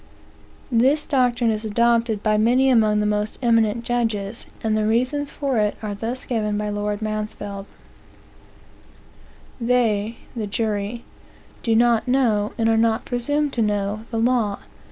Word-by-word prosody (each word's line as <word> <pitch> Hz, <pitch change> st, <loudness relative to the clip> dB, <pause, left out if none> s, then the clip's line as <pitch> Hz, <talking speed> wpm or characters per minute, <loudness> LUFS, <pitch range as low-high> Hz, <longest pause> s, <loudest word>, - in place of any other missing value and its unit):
This 265 Hz, +6 st, +3 dB
doctrine 245 Hz, -4 st, +2 dB
is 215 Hz, 0 st, -3 dB
adopted 230 Hz, 0 st, +1 dB
by 215 Hz, -1 st, +2 dB
many 245 Hz, +5 st, +3 dB
among 215 Hz, -3 st, +3 dB
the -, -, 0 dB
most 210 Hz, 0 st, -1 dB
eminent 230 Hz, -1 st, +2 dB
judges, 225 Hz, -3 st, -2 dB, 0.2 s
and 220 Hz, -1 st, +1 dB
the 215 Hz, 0 st, +1 dB
reasons 255 Hz, +6 st, 0 dB
for 275 Hz, -6 st, -1 dB
it 210 Hz, -1 st, +1 dB
are 210 Hz, -1 st, -3 dB
thus 230 Hz, +5 st, -4 dB
given 210 Hz, -4 st, -1 dB
by 210 Hz, 0 st, -2 dB
Lord 205 Hz, +1 st, -2 dB
Mansfield: 210 Hz, -2 st, -4 dB, 1.9 s
"They 230 Hz, -2 st, +1 dB, 0.2 s
(the 220 Hz, -3 st, -3 dB
jury) 210 Hz, +2 st, -2 dB, 0.6 s
do 225 Hz, -2 st, +1 dB
not 235 Hz, +1 st, +3 dB
know, 230 Hz, -5 st, +2 dB
and 225 Hz, -, +1 dB
are 225 Hz, 0 st, +3 dB
not 225 Hz, 0 st, +1 dB
presumed 290 Hz, +4 st, -1 dB
to 235 Hz, -, 0 dB
know, 210 Hz, 0 st, -1 dB
the 230 Hz, -, -3 dB
law. 225 Hz, -3 st, +1 dB
225 Hz, 145 wpm, -22 LUFS, 210-240 Hz, 1.9 s, This